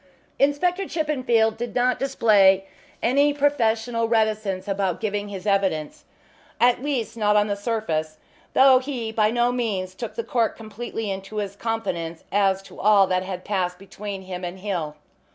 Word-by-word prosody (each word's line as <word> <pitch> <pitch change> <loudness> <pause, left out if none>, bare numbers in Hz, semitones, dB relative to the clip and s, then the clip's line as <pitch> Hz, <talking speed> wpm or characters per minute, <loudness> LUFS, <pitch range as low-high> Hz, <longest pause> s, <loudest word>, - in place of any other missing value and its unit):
Inspector 350 +7 +2
Chippenfield 255 -8 +1
did 240 +1 -5
not 250 0 +2
display 205 -8 +4 0.4
any 285 +4 +3
professional 230 -5 +1
reticence 215 -4 0
about 195 -3 -1
giving 205 -1 -2
his 195 -1 -7
evidence 190 -7 0 0.5
at 245 0 +4
least, 260 -6 -2
not 210 -2 +2
on 210 0 +4
the 205 -1 -1
surface, 185 -8 -2 0.4
though 265 -1 +7
he 255 -4 -4
by 215 -1 +2
no 240 +1 +2
means 205 -7 -2
took 230 +4 -7
the 230 - -2
court 230 -1 0
completely 220 -1 -5
into 195 +2 -7
his 200 -2 -3
confidence 175 -8 -3
as 195 -1 +2
to - - -14
all 205 -1 +5
that 185 -1 0
had 185 -1 -6
passed 180 -3 -1
between 195 0 -7
him 185 -1 -7
and 180 +1 -6
Hill. 175 -7 -3
215 Hz, 155 wpm, -24 LUFS, 195-240 Hz, 0.5 s, though